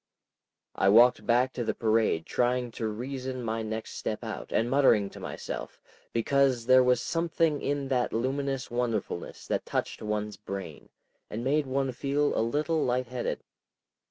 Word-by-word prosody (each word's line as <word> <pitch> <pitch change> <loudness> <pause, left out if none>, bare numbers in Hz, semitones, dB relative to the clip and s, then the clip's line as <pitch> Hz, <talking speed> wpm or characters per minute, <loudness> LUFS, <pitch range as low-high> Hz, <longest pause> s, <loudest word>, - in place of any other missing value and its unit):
I 95 - +3
walked 120 +4 +6
back 125 +2 +3
to 120 - -2
the 110 -2 -1
parade 110 -7 +1
trying 125 0 0
to 110 0 -3
reason 130 +3 -4
my 115 0 -2
next 110 0 -5
step 110 - -3
out, 110 -2 -6
and 115 - +2
muttering 120 -7 +4
to - - -11
myself, - - -6 0.3
because 130 0 +2
there 130 +1 +7
was 125 -1 +3
something 165 0 0
in 140 0 -1
that 125 -2 +1
luminous 135 +3 -2
wonderfulness 115 -7 -3
that - - -1
touched - - -3
one's 105 -1 -3
brain, 95 -7 -7 0.4
and 115 +2 -4
made 145 +2 +1
one 135 0 0
feel 140 +3 0
a - - +2
little 150 +7 0
light 125 0 0
headed. 125 -1 -3
125 Hz, 155 wpm, -28 LUFS, 110-135 Hz, 0.4 s, there